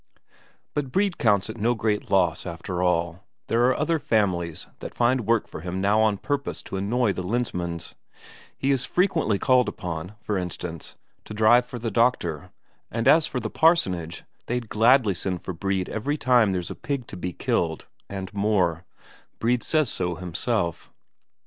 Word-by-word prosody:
But 140 -3 -2
Brede 195 +1 +1
counts 100 -4 +3
it 110 +1 -7
no 120 +3 +2
great 110 -2 -1
loss, 90 -4 +2
after 85 +1 -4
all; 85 +1 0 0.2
there 120 +1 +2
are 130 - +2
other 160 +2 +1
families 90 - 0
that - - -8
find 120 -1 +2
work 115 -1 +2
for - - -8
him 90 +2 -4
now 100 +3 +3
on 110 -2 +2
purpose 145 +5 -3
to - - -7
annoy 105 +3 +1
the 95 - -4
Lensmand's; 90 -5 -3 0.6
he 135 - +1
is 135 -2 +1
frequently 165 - +1
called 125 +3 +3
upon, 90 +3 -6
for 105 -4 -2
instance, 90 -2 -6 0.3
to 105 - -8
drive 120 +3 +5
for 125 - -7
the 115 -1 -3
doctor, 100 - +1 0.4
and 115 0 -2
as 160 -1 +6
for 125 - -3
the 110 -2 -4
parsonage, 90 - +2 0.2
they'd 120 -2 -2
gladly 115 -1 +4
send 90 0 -4
for 95 - -4
Brede 95 +1 -1
every 145 +8 -2
time 120 -7 +4
there's 90 -2 -3
a - - -6
pig 140 -4 -3
to - - -9
be 90 0 -4
killed, 80 -1 -1 0.2
and 95 0 -6
more 95 -5 +1 0.5
Brede 120 +1 +1
says 155 -3 +2
so 90 -1 -2
himself. 90 +1 -2
105 Hz, 170 wpm, -25 LUFS, 90-125 Hz, 0.6 s, as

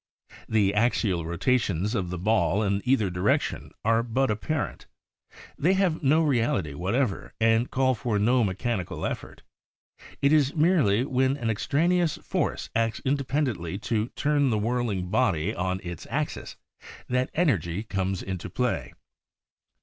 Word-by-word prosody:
The 100 -3 +2
axial 105 -6 +1
rotations 100 +1 0
of 95 -6 -1
the 90 - -4
ball 105 +2 +2
in 100 -1 0
either 125 -7 +2
direction 90 +4 0 0.2
are 115 +1 +3
but 120 +2 0
apparent; 145 +8 -3 0.7
they 175 +6 +3
have 190 -4 +1
no 155 +3 +4
reality 120 - +1
whatever 100 - -2
and 115 +1 +3
call 130 0 +2
for 120 -3 -1
no 120 +4 +3
mechani 100 0 -2
cal - - -5
effort. - - -6 0.8
It 140 +2 +3
is 145 -3 +3
merely 150 - +3
when 130 0 +1
an 115 -5 -1
extraneous 160 - +1
force - - -2
acts 115 0 0
independently 130 - -1 0.2
to 110 0 +1
turn 145 -1 +2
the 110 - +1
whirl 120 +3 0
ing 90 -3 -3
body 100 -9 +1
on 95 +1 -2
its 85 -3 -7
axis - - -3 0.5
that 125 +1 0
energy 100 - +1
comes 95 -3 -2
into 95 -1 -5
play. 125 +6 -2
115 Hz, 140 wpm, -26 LUFS, 95-135 Hz, 0.8 s, no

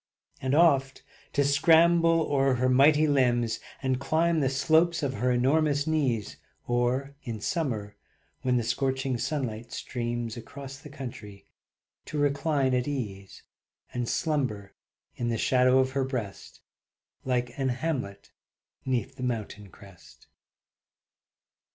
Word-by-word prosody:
And 130 +1 0
oft 140 -5 +3 0.3
to 140 - +2
scramble 165 +3 +4
o'er 135 -3 +2
her 130 +1 +1
mighty 145 +4 +5
limbs, 125 -5 +2 0.2
And 130 -1 0
climb 160 +4 +1
the 135 -3 +1
slopes 160 +5 +2
of 135 -2 -1
her 125 +2 0
enormous 145 +3 +2
knees, 135 -9 -1 0.3
Or 125 +3 0
in 115 -4 -5
summer 110 - -2 0.5
when 125 -1 +1
the 120 - 0
scorching 130 +1 -1
sunlight 120 -4 -3
streams 120 -2 -4
Across 135 +3 -9
the 150 - -12
country, 115 -8 -9 0.6
to 150 - -5
recline 145 -1 +1
at 125 +1 0
ease, 105 -9 -5 0.5
And 120 -1 -2
slumber 130 - -1 0.4
in 120 - -1
the 115 - -1
shadow 130 +2 +3
of 130 0 +2
her 135 0 0
breast 125 -7 -6 0.6
Like 125 -2 -1
an 135 -1 +1
hamlet 125 -7 -3 0.5
'neath 130 +1 -2
the - - -8
mountain 110 -4 -4
crest. 95 -1 -17
130 Hz, 125 wpm, -27 LUFS, 120-145 Hz, 0.6 s, mighty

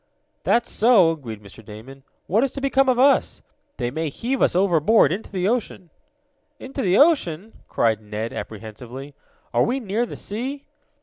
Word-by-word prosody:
"That's 235 0 +1
so!" 215 -7 +5
agreed 115 -10 -8
Mr. 100 +3 -14
Damon. 115 +6 -12 0.2
"What 215 +7 +2
is 275 - 0
to - - -5
become 270 -1 +2
of 250 - +2
us? 275 +2 +3 0.3
They 120 -2 -2
may 160 +3 -2
heave 245 - -3
us - - +3
overboard 180 -1 +4
into 200 +5 -4
the 185 -1 -1
ocean!" 205 -7 -3 0.7
"Into 270 +1 -6
the 190 -2 +2
ocean!" 225 - +2
cried 110 -2 +1
Ned 110 +2 -5
apprehensively. 115 +6 -8 0.4
"Are - - +3
we 255 +3 +1
near 230 +1 -2
the - - -8
sea?" 265 +7 -5
185 Hz, 165 wpm, -22 LUFS, -, 0.7 s, so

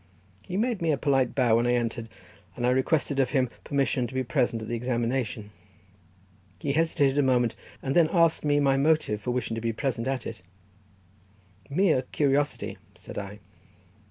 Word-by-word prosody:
He 180 - -5
made 230 -2 0
me 165 -1 +2
a 145 - +1
polite 135 -4 +1
bow 120 -4 +4
when 120 +1 +1
I 120 - +3
entered, 115 -1 -2 0.5
and 120 - -2
I 125 - +4
requested 140 +2 +1
of 130 -2 +2
him 130 -3 +1
permission 135 -3 0
to 130 - -10
be 130 - +1
present 125 -2 0
at - - -7
the 120 - -4
examination. 120 -2 -2 1.1
He 140 - -2
hesitated 145 -3 +2
a - - +6
moment, 125 -3 +2 0.3
and 135 0 -1
then 165 -2 +5
asking 165 -3 +3
me 145 0 +3
my 135 -1 +3
motive 140 -7 +2
for 115 - -4
wishing 125 -2 -1
to 115 - -3
be 115 0 -1
present 120 0 -2
at 135 -3 -2
it. 115 -4 -7 1.3
"Merely 155 -2 +3
curiosity," 145 0 0 0.2
said - - -8
I. 100 +1 -8
130 Hz, 180 wpm, -27 LUFS, 120-145 Hz, 1.3 s, a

